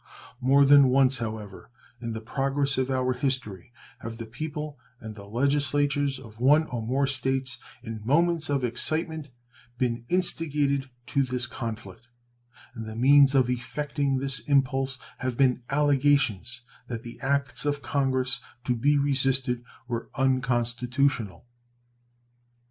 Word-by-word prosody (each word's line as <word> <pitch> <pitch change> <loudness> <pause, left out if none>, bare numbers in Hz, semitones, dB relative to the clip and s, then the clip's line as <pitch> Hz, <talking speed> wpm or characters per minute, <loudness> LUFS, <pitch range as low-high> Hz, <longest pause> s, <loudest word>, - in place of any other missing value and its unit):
More 135 +2 +4
than 140 -1 +7
once, 130 -1 +3
however, 110 -4 -6 0.3
in 115 -1 -4
the 110 - -5
progress 135 +3 0
of 130 0 0
our 130 -1 +1
history 125 - -3 0.3
have 115 -1 -7
the 115 - -6
people 150 +4 -6 0.2
and 110 -1 -8
the 100 -1 -11
legislatures 140 +3 +1
of 115 -4 -13
one 145 +5 +5
or 120 -2 -3
more 130 +5 0
States, 130 -1 -1 0.2
in 115 -2 -6
moments 160 +5 +2
of 140 -2 0
excitement, 155 +5 -1 0.5
been 120 -2 -1
instigated 150 -6 +1 0.2
to 140 +1 0
this 125 -1 0
conflict; 115 -1 -7 0.7
and 115 -3 -7
the 110 - -7
means 140 +3 +5
of 130 -3 +4
effecting 140 +2 -2
this 135 -1 -1
impulse 135 +1 +1 0.2
have 130 -2 -3
been 130 -2 +3
allegations 140 -5 +2 0.3
that 115 -2 -5
the 120 0 -10
acts 140 -1 -1
of 145 -1 -1
Congress 130 0 +1 0.2
to 125 0 0
be 145 +5 +2
resisted 135 -3 +1 0.2
were 120 -1 -4
unconstitutional. 125 - 0
130 Hz, 130 wpm, -26 LUFS, 120-140 Hz, 0.7 s, than